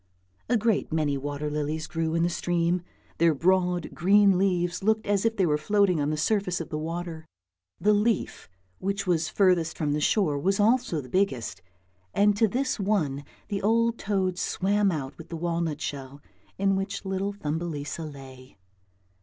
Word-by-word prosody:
A 245 - +4
great 220 -4 0
many 155 -3 +1
water 145 +2 -4
lilies 150 +1 -2
grew 165 -1 -2
in 165 - +2
the 175 - +2
stream, 175 0 0 0.4
their 165 -2 +4
broad 180 +1 +1
green 200 +2 +5
leaves 180 -2 0
looked 220 +1 +2
as 205 +1 +1
if 225 0 +1
they 190 - +3
were 150 -2 +1
floating 195 -1 +2
on 145 - 0
the 155 - -1
surface 180 +2 0
of 165 - -6
the 150 - -3
water. 165 0 -5 0.5
The 210 +1 +4
leaf 210 - 0 0.3
which 195 +2 -2
was 165 -3 +1
furthest 180 -5 +2
from 150 -2 0
the 150 - -1
shore 155 -6 +2
was 195 +6 +1
also 210 - +2
the 125 - -12
biggest, 130 - -1 0.5
and 205 0 +4
to 220 +2 +3
this 260 +4 -1
one 165 -9 0 0.3
the 200 -1 -2
old 230 +2 +2
toad 190 -3 -1
swam 200 +1 +1
out 140 -4 -4
with 165 - -11
the 165 - -5
walnut 165 -2 -2
shell 140 0 -5 0.4
in 195 0 +2
which 195 +2 -3
little 195 +1 -2
Thumbelisa 160 -3 -4
lay. 135 -3 -11
175 Hz, 170 wpm, -27 LUFS, 155-200 Hz, 0.5 s, green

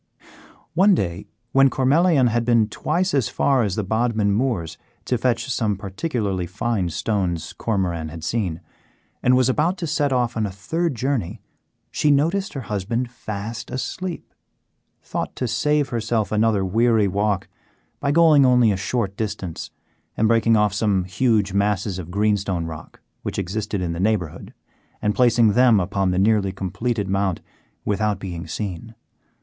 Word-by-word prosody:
One 190 +4 +5
day, 90 - -3 0.2
when 135 0 +5
Cormelian 140 +2 +3
had 120 +1 0
been 115 -2 +3
twice 175 - -1
as 135 -6 +1
far 135 -2 +2
as 100 -4 0
the 110 - -1
Bodmin 110 0 +1
moors 105 -7 -1 0.3
to 125 - 0
fetch 120 0 0
some 110 -4 0
particularly 100 - -3
fine 95 0 -1
stones 90 -3 -2
Cormoran 90 -7 -2
had 80 0 -9
seen, 85 -3 -2 0.6
and 125 +1 +4
was 130 -1 +3
about 155 +8 +1
to 175 - -3
set 150 -3 0
off 125 -2 0
on 110 -2 0
a - - -6
third 160 - -2
journey, 125 -6 -2 0.5
she, 150 - +1
noticing 165 +8 +1
her 125 - -9
husband 115 +5 -2
fast 110 -1 -6
asleep, 170 +8 -5 0.7
thought - - -4
to 125 - -2
save 150 +3 +1
herself 115 -2 -1
another 105 -2 +2
weary 110 +2 +3
walk 100 0 0 0.5
by 140 - 0
going 155 -2 +6
only 125 -3 +5
a 100 - -1
short 100 0 -2
distance 100 -6 -4 0.5
and 110 - +3
breaking 115 0 +3
off 105 -2 +2
some 100 -3 +1
huge 100 +1 +1
masses 100 -1 0
of 85 -2 -7
greenstone 100 -3 0
rock 80 -1 -9 0.2
which - - -5
existed 100 +1 -2
in 85 -1 -2
the 85 - -5
neighbourhood 95 -5 -1 0.5
and 105 0 0
placing 120 -2 +4
them 125 -3 +5
upon 95 +1 0
the 90 - 0
nearly 100 0 +2
completed 100 +3 -2
Mount 95 -2 0 0.5
without 105 0 0
being 90 -3 -6
seen. 105 +2 -5
110 Hz, 155 wpm, -22 LUFS, 95-125 Hz, 0.7 s, going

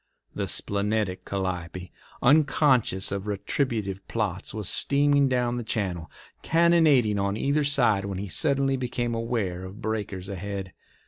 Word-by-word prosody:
The - - -3
splenetic 100 -1 -1
Calliope, 90 -2 -4 0.3
unconscious 135 -8 +3
of 100 +1 -4
retributive 105 -2 -2
plots, 100 -5 -3
was 105 -3 -4
steaming 140 -1 +3
down 125 -1 0
the 120 - -3
channel, 95 -7 -2 0.3
cannonading 160 -10 +3
on 100 +1 -1
either 145 +5 +1
side, 120 -9 +2
when 100 -2 -4
he 100 +2 -4
suddenly 135 - +1
became 120 -1 -2
aware 115 -6 -2
of 95 +3 -9
breakers 105 -5 -4
ahead. 100 0 -5
110 Hz, 130 wpm, -26 LUFS, 95-130 Hz, 0.3 s, unconscious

